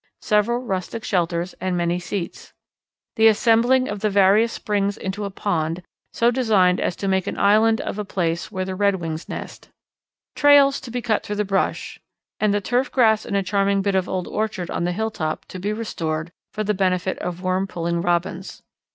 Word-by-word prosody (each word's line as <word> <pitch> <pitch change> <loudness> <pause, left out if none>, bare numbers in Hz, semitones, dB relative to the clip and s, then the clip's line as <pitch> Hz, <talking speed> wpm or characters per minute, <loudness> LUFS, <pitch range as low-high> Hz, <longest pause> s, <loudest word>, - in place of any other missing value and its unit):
Several 210 +2 +2
rustic 225 -2 -4
shelters 175 -1 -1
and 185 -1 -1
many 175 0 0
seats. 180 0 -6 0.6
"The 220 0 +6
assembling 235 +4 +4
of 205 - -4
the 215 - 0
various 200 +3 +4
springs 205 -3 -1
into 200 +2 -4
a - - -3
pond, 175 -3 -2 0.3
so 235 +1 +2
designed 210 -8 +3
as - - -1
to 200 - -4
make 190 0 +1
an - - -3
island 220 +2 +4
of 210 - -5
a - - -1
place 170 -4 -2
where 185 0 -3
the 190 - -4
Redwings 185 -5 -1
nest. - - -8 0.7
"Trails 285 -1 +5
to 250 - -9
be 245 0 -4
cut 220 -3 +1
through 210 - -4
the 210 0 -1
brush 195 0 -1 0.4
and 215 -1 +2
the 205 0 +1
turf 245 +6 0
grass 220 -4 +3
in 205 - -2
a 200 - +1
charming 195 +1 +1
bit 200 0 0
of 190 -1 0
old 185 -1 -2
orchard 210 -5 -3
on 170 - -1
the 175 - 0
hilltop, 180 -6 -3
to 185 - -7
be 200 +3 -2
restored 165 -7 -3 0.2
for 215 - -3
the 210 0 0
benefit 185 -1 0
of 180 +1 -5
worm 185 +1 0
pulling 170 -1 -2
Robins. 175 +2 -2
195 Hz, 190 wpm, -22 LUFS, 180-215 Hz, 0.7 s, The